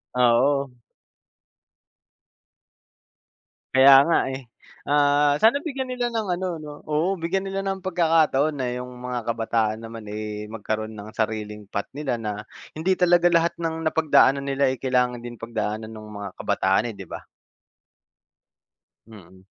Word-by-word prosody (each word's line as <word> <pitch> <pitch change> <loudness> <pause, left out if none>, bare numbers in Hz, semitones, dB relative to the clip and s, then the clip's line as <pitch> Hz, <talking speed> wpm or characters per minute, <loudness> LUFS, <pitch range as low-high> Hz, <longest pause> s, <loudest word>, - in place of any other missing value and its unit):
Oo. 125 +2 +3 3.0
Kaya 135 +1 +9
nga, 170 - +4
eh. 130 -2 -7 0.4
Ah, 145 0 +3
sana 230 +6 +5
bigyan 270 -4 -4
nila 245 -1 -1
ng 220 -2 -1
ano, 185 - -2
'no, 150 -1 -8
oo, 160 +6 0
bigyan 180 +4 -1
nila 195 0 -3
ng 195 -1 -3
pagkakataon 160 -5 +2
na 130 -3 -2
'yong 125 0 -5
mga 125 0 -5
kabataan 115 -1 0
naman, 115 -1 -8
eh, 105 0 -5
magkaroon 110 0 -4
ng 105 +1 -9
sariling 105 -2 -3
path 100 +1 -4
nila. 140 -3 -2
Na 105 -2 -5 0.3
hindi 175 +5 0
talaga 175 -1 +4
lahat 170 0 +2
ng 165 -1 -3
napagdaanan 155 -3 +3
nila, 135 -1 +2
eh, 130 - -5
kailangan 125 -2 +1
din 120 0 -8
pagdaanan 110 -1 -4
no'ng 110 -1 -10
mga 100 -1 -5
kabataan, 120 - +1
eh, - - -15
'di 95 - -8
ba? - - -8 1.8
Mm. 95 -3 -15
130 Hz, 140 wpm, -24 LUFS, 110-165 Hz, 3.0 s, Kaya